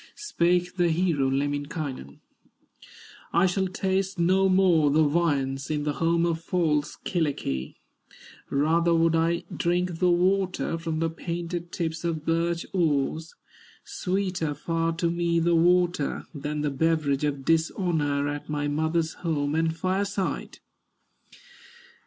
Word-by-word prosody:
Spake 180 - 0
the 175 -1 +3
hero, 160 -5 +1
Lemminkainen: 145 - -3 1.1
"I 170 +3 +4
shall 190 +1 +1
taste 190 +1 -1
no 190 +3 +3
more 180 -5 +4
the 155 +2 +4
viands, 145 -4 0
In 150 -1 -1
the 150 0 -1
home 165 +1 +2
of 165 -1 -1
false 155 -4 0
Kyllikki; 140 - -2 0.7
Rather 165 +4 +2
would 165 0 +3
I 165 +1 +1
drink 175 0 0
the 180 - +3
water 185 0 +1
From 165 -1 -3
the 165 - +1
painted 170 +1 -5
tips 160 -1 -3
of 160 -2 -2
birch 170 +1 0
oars; 160 -2 0 0.5
Sweeter 180 -5 -2
far 165 +1 -1
to 165 0 0
me 170 0 +1
the 170 +1 +2
water, 175 -2 +2
Than 150 0 -4
the 150 -1 0
beverage 150 -1 +1
of 140 -2 -2
dishonor, 160 -3 +1
At 145 +1 -5
my 145 -1 -1
mother's 160 +2 0
home 145 -4 -1
and 160 0 0
fireside! 190 -2 -2
165 Hz, 130 wpm, -26 LUFS, 150-175 Hz, 1.1 s, I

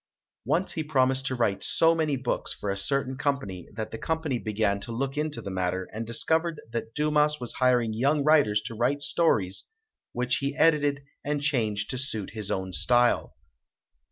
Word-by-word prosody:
Once 185 +3 +1
he 160 - -2
promised 135 -2 +1
to 130 - -1
write 105 -5 0
so 165 0 +4
many 155 -3 0
books 130 -1 -2
for 100 - -3
a - - -2
certain 130 +6 0
company 130 - -2
that 110 +1 -5
the 110 - -6
company 160 -6 -1
began 105 -2 0
to 110 - -5
look 135 +4 -2
into 150 0 -2
the 100 - -5
matter, 95 0 -2
and 110 +1 -4
discovered 160 +7 +1
that 115 -1 -4
Dumas 150 0 +2
was 120 -2 -3
hiring 125 -3 +2
young 140 +6 +2
writers 140 -9 +4
to 115 - -6
write 130 +6 0
stories, 105 - +1 0.5
which 125 +1 0
he 140 +1 -2
edited 145 -4 +3 0.2
and 145 0 -1
changed 110 -8 0
to 130 - -2
suit 110 -8 -2
his 105 -2 -5
own 95 -1 -2
style. 120 +9 +2
130 Hz, 180 wpm, -27 LUFS, 110-145 Hz, 0.5 s, so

